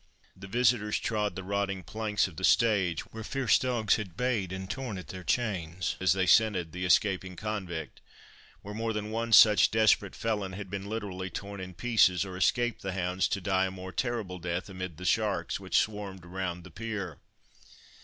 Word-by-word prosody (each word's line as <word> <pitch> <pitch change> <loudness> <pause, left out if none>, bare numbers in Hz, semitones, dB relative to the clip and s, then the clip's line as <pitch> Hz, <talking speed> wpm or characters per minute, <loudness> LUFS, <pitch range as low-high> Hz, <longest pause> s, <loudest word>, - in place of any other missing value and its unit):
The 95 +1 -10
visitors 110 -1 +2
trod 105 -2 -1
the 95 - -5
rotting 100 -1 -2
planks 105 -1 0
of 90 - -13
the 95 - -6
stage, 95 -7 +3
where 110 0 -6
fierce 135 0 +2
dogs 120 -5 +1
had 95 -5 -7
bayed 115 -8 0
and 95 0 -5
torn 125 -3 -4
at 90 -5 -9
their 95 -1 -7
chains, 90 -8 -1
as 95 -1 +4
they 95 -1 +1
scented 95 -4 +3
the 90 +2 -4
escaping 95 0 +2
convict—where 95 0 -8
more 115 +1 -2
than 105 0 -4
one 115 +1 -2
such 105 -1 +8
desperate 110 -3 +3
felon 105 -4 -2
had 95 -1 -7
been 100 0 -4
literally 95 -4 -4
torn 100 +1 -6
in 90 -1 -8
pieces, 100 -5 +3
or 95 -1 -7
escaped 120 +5 +1
the 95 -1 -3
hounds 90 0 0
to 100 - -1
die 95 0 +1
a - - -3
more 95 0 -8
terrible 110 -6 -2
death 85 +3 -3
amid 95 -4 -6
the 90 - -8
sharks 105 +1 0
which - - 0
swarmed 100 -4 -2
around 90 -1 -4
the 95 - -12
pier. 100 -4 -5
100 Hz, 185 wpm, -29 LUFS, 90-110 Hz, -, such